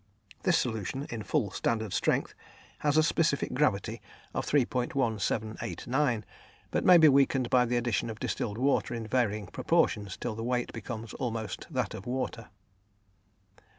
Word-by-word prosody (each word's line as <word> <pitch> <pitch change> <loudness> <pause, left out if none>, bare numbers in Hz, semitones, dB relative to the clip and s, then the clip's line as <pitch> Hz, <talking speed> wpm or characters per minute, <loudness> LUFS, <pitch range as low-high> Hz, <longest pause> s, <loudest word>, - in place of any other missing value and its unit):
This 175 -3 +3
solution, 125 +4 -2
in 115 -2 -4
full 110 -3 0
standard 110 -2 -1
strength, - - +1 0.5
has 150 0 +2
a 155 - +6
specific 155 -2 +1
gravity 115 -9 0 0.3
of - - -2
3.1789, 120 -1 0 0.5
but - - 0
may 180 -1 +8
be 160 -2 +7
weakened 135 -3 +3
by 125 -1 +5
the 120 +1 0
addition 120 -1 0
of 110 0 -6
distilled 105 -2 -2
water 130 -1 +1
in 115 -1 -4
varying 110 -3 0
proportions 100 +1 0
till 120 - -3
the 115 +1 -5
weight 125 0 -1
becomes 115 -2 -6
almost 110 -5 -4
that - - -2
of 95 - -8
water. 125 -2 -3
120 Hz, 145 wpm, -29 LUFS, 110-135 Hz, 0.5 s, may